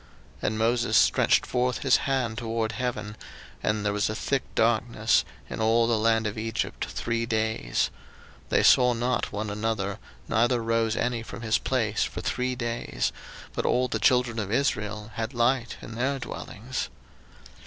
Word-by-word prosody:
02:010:022 - - -1
And 110 - -1
Moses 115 +2 +2
stretched - - +4
forth 125 -1 0
his 135 -2 +5
hand 125 -5 0
toward 115 -1 -1
heaven; 110 -5 -3 0.5
and 105 0 0
there 105 - +1
was 105 0 +1
a 110 - -3
thick 135 +4 0
darkness 115 -1 +2 0.2
in - - -5
all 115 +1 +4
the 115 0 +2
land 110 0 +2
of 105 +1 -2
Egypt 115 0 -2
three 115 0 -2
days: 110 - 0 0.5
02:010:023 - - -27
They - - +3
saw 125 -1 +6
not 120 +1 -1
one 105 0 -3
another, 105 -2 -2 0.3
neither 120 +2 +2
rose 115 -1 +1
any 120 -1 0
from 115 0 -8
his 110 -1 +2
place - - 0
for - - -4
three 125 0 -1
days: 115 - -2 0.4
but - - -2
all 125 +1 +2
the - - -2
children 125 -2 +3
of 100 -2 -3
Israel 110 -4 -1
had 115 +3 -4
light 120 0 +1
in 110 - -8
their 130 +4 0
dwellings. 130 -1 -5
115 Hz, 165 wpm, -27 LUFS, 110-125 Hz, 0.5 s, saw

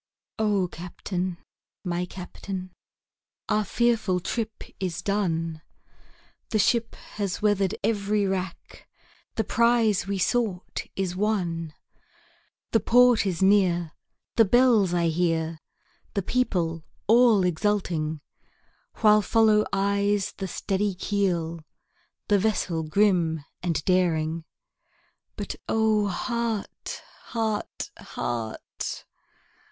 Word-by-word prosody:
O 205 -4 +2
CAPTAIN! 180 +1 -4 0.5
my 180 -1 -2
Captain, 185 +1 -7 0.8
our 210 -1 +2
fearful 220 -3 +1
trip 220 +4 -4 0.2
is 180 -3 -3
done, 165 -6 -1 0.9
The 220 - +1
ship 230 +2 +2 0.2
has 200 -1 -2
weather'd 200 -3 +2
every 205 -1 +1
rack, 190 -2 -4 0.5
the 220 - +1
prize 230 -2 +2
we 200 0 -1
sought 190 -1 -1
is 185 -2 -2
won, 175 -6 -1 1.0
The 225 - +4
port 240 0 +5
is 185 -1 -1
near, 180 -4 +3 0.5
the 225 - +8
bells 230 -3 +4
I 170 -1 +2
hear, 165 -1 0 0.6
the 200 - 0
people 175 -9 0 0.2
all 230 -3 +5
exulting, 170 -4 0 0.8
While 215 -1 +6
follow 215 +1 +4
eyes 200 0 +1
the 195 - -4
steady 195 +2 -1
keel, 175 -4 -1 0.7
the 205 -2 +4
vessel 185 -5 0
grim 165 -2 +2 0.2
and 170 -4 -1
daring; 165 -3 +1 0.9
But - - -5
O 220 -2 +3
heart! 230 +2 -3 0.2
heart! 220 -2 -3
heart! 115 -2 -5
195 Hz, 100 wpm, -26 LUFS, 175-215 Hz, 1.0 s, the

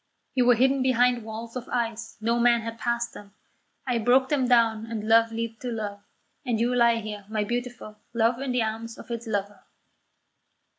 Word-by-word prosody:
You 250 -2 +2
were 245 - +7
hidden 265 +3 +3
behind 250 -2 +3
walls 225 +2 -7
of 250 -1 -6
ice; 230 -2 -3
no 230 +2 +1
man 235 -1 +4
had 230 +1 -6
passed 235 0 -1
them; 200 0 -13 0.5
I 250 -3 0
broke 255 +3 +3
them 270 -4 +1
down 230 -2 +3
and 220 -2 -4
love 225 0 +5
leaped 225 0 -4
to 250 - -3
love, 205 -3 -4 0.4
and 240 -5 -1
you 240 +2 +1
lie 235 -1 +4
here, 210 -2 -5
my 215 -1 0
beautiful, 240 -1 -5
love 235 +1 +1
in 270 -1 -2
the 250 -2 +1
arms 225 +1 -4
of - - -11
its 235 0 -4
lover." 205 -2 -3
230 Hz, 190 wpm, -26 LUFS, 220-245 Hz, 0.5 s, were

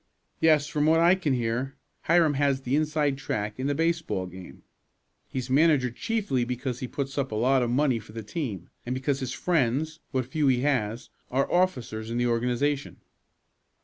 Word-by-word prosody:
"Yes, 155 -3 +4
from 150 0 0
what 160 +1 +5
I 170 +2 +6
can 175 -7 0
hear, 120 +2 -1 0.3
Hiram 165 -2 +4
has 140 -1 +1
the 130 +1 0
inside 150 -2 +1
track 105 -2 -3
in 130 - -1
the 145 - 0
baseball 160 - 0
game. 90 0 -11 0.6
He's 130 -2 -4
manager 140 -2 +3
chiefly 200 - -1
because 125 +1 -3
he 130 - -4
puts 135 +2 -3
up 135 -3 -2
a - - -2
lot 130 +4 +3
of 120 - 0
money 130 -1 +2
for 105 - -14
the 115 0 -6
team, 105 - -4 0.2
and 125 +1 -3
because 135 +1 -1
his 130 -2 -3
friends, 155 +2 0
what 130 -2 -1
few 145 +3 0
he 125 -2 +3
has, 120 -5 -1 0.2
are 135 +2 0
officers 125 -12 0
in 115 - -2
the 120 - +1
organization." 125 +4 0
135 Hz, 180 wpm, -27 LUFS, 120-150 Hz, 0.6 s, I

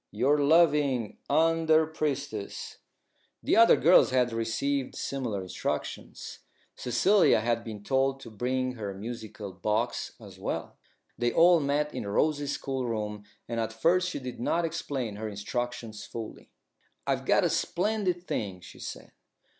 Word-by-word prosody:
Your 135 +8 +2
loving 145 -6 +3
"UNDER 160 +1 +4
PRIESTESS." 140 -9 -4 0.6
The - - +2
other 230 +1 +8
girls 175 +3 +6
had 125 -2 +2
received 125 +4 -1
similar 120 -8 -3
instructions. 90 - -5 0.4
Cecilia 125 - +4
had 115 +1 0
been 105 -3 -7
told 135 +2 +1
to 115 - -10
bring 130 +4 -1
her 105 -5 -5
musical 110 -1 -7
box 105 +6 -1
as 100 -4 -13
well. - - -4 0.4
They 120 0 +2
all 175 0 +6
met 150 +1 0
in 105 - -4
Rose's 145 +6 +1
schoolroom, 110 -6 -3 0.2
and 115 -1 -3
at 115 0 -1
first 175 +11 +2
she - - -4
did 125 -3 -7
not 165 +8 +1
explain 135 -9 -3
her 110 0 -4
instructions 115 +1 -4
fully. 115 -2 -8 0.6
"I've - - -1
got - - +4
a - - +3
splendid 185 -2 0
thing," 95 - -3
she 90 - -13
said. - - -8
125 Hz, 140 wpm, -28 LUFS, 110-150 Hz, 0.6 s, other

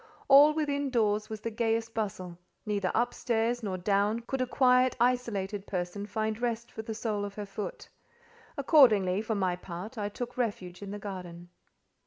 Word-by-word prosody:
All 280 +2 +8
within 285 -2 0
doors 215 -4 +1
was 220 -1 -6
the 230 - -3
gayest 225 0 -1
bustle; 185 -6 -4 0.3
neither 200 -3 0
up 240 +2 +1
stairs 235 +1 0
nor 195 -4 -3
down 205 +4 +1
could 260 +3 -3
a 255 - 0
quiet, 255 0 +4
isolated 215 -5 0
person 185 +2 -3
find 220 +1 -2
rest 235 -1 -2
for - - -6
the 220 0 -6
sole 215 -2 -2
of 200 -1 -6
her 210 - -5
foot; 200 +1 -6 0.7
accordingly, 215 - +5
for 220 0 -2
my 185 -3 0
part, 185 +6 -8
I 205 0 -1
took 245 +4 -6
refuge 200 -7 -3
in 200 - -6
the 205 - -5
garden. 180 -4 -8
215 Hz, 175 wpm, -29 LUFS, 200-240 Hz, 0.7 s, All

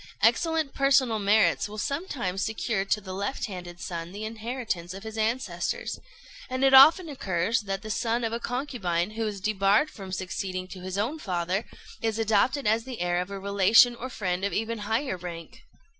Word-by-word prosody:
Excellent 315 +6 +2
personal 270 -5 +3
merits 205 +1 +3
will 215 - -8
sometimes 240 - -2
secure 220 -2 -1
to 200 +2 0
the 190 -2 -8
left 200 +8 -2
handed 180 -4 -8
son 170 -1 -5
the 205 +3 -6
inheritance 220 -5 -4
of 195 - -9
his 220 0 -7
ancestors; 240 - -2 0.5
and 255 +1 -2
it 270 0 +5
often 315 +7 +8
occurs 205 - 0
that 195 -2 -4
the 215 - -5
son 230 +2 0
of 225 0 -1
a 230 - -1
concubine, 235 -9 -2
who 220 0 -2
is 205 -2 -4
debarred 205 +6 +2
from 190 -2 -9
succeeding 185 0 -4
to 190 - -9
his 185 +1 -5
own 245 +10 -1
father, 185 - -1 0.4
is 225 -1 -1
adopted 225 +5 +2
as 220 +2 +2
the 255 -1 -7
heir 175 0 +1
of 180 - -6
a 200 - -5
relation 200 +5 +5
or 250 +2 -6
friend 185 -6 -2
of 200 - -1
even 225 +1 -2
higher 220 +1 -1
rank. 170 -2 -8
215 Hz, 185 wpm, -27 LUFS, 190-240 Hz, 0.5 s, often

